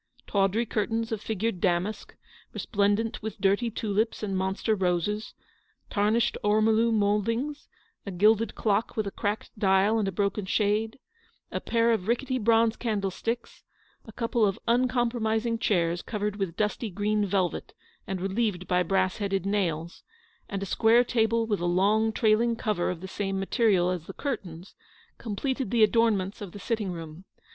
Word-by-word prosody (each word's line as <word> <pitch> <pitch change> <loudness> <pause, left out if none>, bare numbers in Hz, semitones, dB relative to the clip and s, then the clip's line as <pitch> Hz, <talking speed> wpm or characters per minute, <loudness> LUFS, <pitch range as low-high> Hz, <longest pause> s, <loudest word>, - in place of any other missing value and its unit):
Tawdry 200 +3 +1
curtains 225 +1 -1
of 220 -2 -2
figured 220 -3 -2
damask, 185 +4 -1 0.4
re - - -4
splendent 205 +2 0
with 220 0 -6
dirty 205 +4 +2
tulips 220 0 -1
and 195 -2 -2
monster 190 +4 0
roses, 190 +2 -1 0.6
tarnished 215 +2 +1
ormolu 220 +2 +3
mouldings, 230 +7 0 0.4
a - - -6
gilded 210 +4 +3
clock 215 +1 0
with 215 - 0
a 200 - -4
cracked 205 +1 -3
dial 195 +3 +3
and 205 - 0
a - - -1
broken 200 +1 -1
shade, 215 +2 0 0.5
a - - -2
pair 230 0 +2
of 215 -4 -1
rickety 255 +2 0
bronze 230 0 +3
candlesticks, 225 +1 -3 0.4
a - - -9
couple 230 +1 0
of 195 -2 +2
uncom 240 0 +2
promising 225 0 -1
chairs 175 -6 +1
covered 210 -1 -3
with 190 -5 -3
dusty 210 +2 -1
green 210 +2 0
velvet 190 -3 -1 0.3
and 190 -1 -3
relieved 195 -2 -1
by 180 -1 +2
brass 185 +1 +1
headed 195 -3 -1
nails, 170 -5 -1 0.5
and 195 -2 -3
a - - -2
square 225 +5 +4
table 230 -1 +1
with 210 -3 -1
a 175 - -2
long 205 +5 +2
trailing 225 +1 +2
cover 210 -6 -1
of 175 -2 -4
the 190 - -6
same 195 0 -3
mate 195 +6 -4
rial 190 -6 +4
as 175 -3 -4
the - - -7
curtains, 190 - -5 0.5
completed 250 +3 -2
the 230 0 +4
adornments 215 -2 +2
22 205 - -6
of - - -14
the 205 - -8
sitting 210 -2 -2
room. 165 0 -8
210 Hz, 165 wpm, -27 LUFS, 195-225 Hz, 0.6 s, square